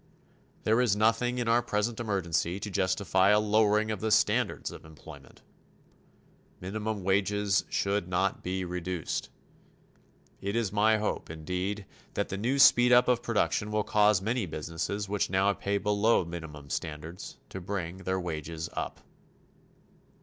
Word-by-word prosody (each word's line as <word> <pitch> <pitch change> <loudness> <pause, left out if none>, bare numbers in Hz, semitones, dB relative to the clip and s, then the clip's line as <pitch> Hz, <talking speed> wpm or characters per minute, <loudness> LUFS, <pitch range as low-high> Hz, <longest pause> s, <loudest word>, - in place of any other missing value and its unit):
There 110 +3 +3
is 115 -6 +2
nothing 115 +3 +2
in 120 -2 -1
our 115 +1 +4
present 110 0 -1
emergency 95 -4 -1
to 105 - -5
justify 95 0 +2
a 105 - +5
lowering 105 0 +2
of 105 - -4
the 110 - 0
standards 105 - +1
of - - -11
employment. 80 -1 -14 1.2
Minimum 105 +2 -4
wages 100 +1 +1
should 100 -2 0
not 95 +1 0
be 95 0 -3
reduced. 90 -1 -3 1.1
It 100 +2 -3
is 115 -4 0
my 110 +1 +4
hope, 110 - -3
indeed, 90 +6 -4 0.3
that - - -1
the 95 - -3
new 125 +6 0
speed 125 -2 +6
up 125 0 +6
of 125 -1 +2
production 105 -1 0
will 105 0 0
cause 105 -2 +3
many 115 -1 -1
businesses 85 +6 -4
which 100 0 -1
now 95 +2 +2
pay 100 +1 -1
below 105 +1 +2
the 85 - -10
minimum 75 -4 -8
standards 80 +3 -6
to 95 - -7
bring 90 -2 -4
their 95 0 -2
wages 80 -2 -5
up. - - -5
100 Hz, 150 wpm, -29 LUFS, 90-110 Hz, 1.2 s, speed